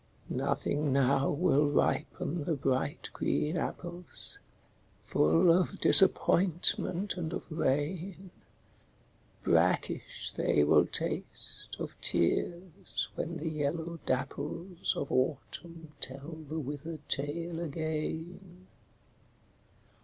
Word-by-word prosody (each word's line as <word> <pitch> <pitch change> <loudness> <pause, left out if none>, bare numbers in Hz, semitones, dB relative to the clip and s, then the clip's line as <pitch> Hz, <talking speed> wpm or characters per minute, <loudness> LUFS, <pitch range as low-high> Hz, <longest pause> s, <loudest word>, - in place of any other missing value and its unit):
Nothing 140 +2 0
now 135 0 +3
will 150 -2 +2
ripen 150 +2 0
the 160 +2 0
bright 135 +1 -1
green 150 +3 0
apples, 175 +1 -3 0.6
Full 80 - +4
of 185 +3 +1
disappointment 185 0 +4
and 165 -2 -3
of - - -4
rain, 170 +6 -2 1.1
Brackish - - +1
they 75 - +2
will 75 - +5
taste, - - -3
of - - -6
tears, 170 - 0
when 170 0 -4
the 160 +2 -3
yellow 160 +2 -3
dapples 150 +7 -2
Of 140 - -3
Autumn 160 +4 -2
tell 140 +5 -2 0.2
the 155 +3 -4
withered 150 +1 -6
tale 165 +4 -2
again. 165 +3 -5
160 Hz, 95 wpm, -31 LUFS, 140-175 Hz, 1.1 s, will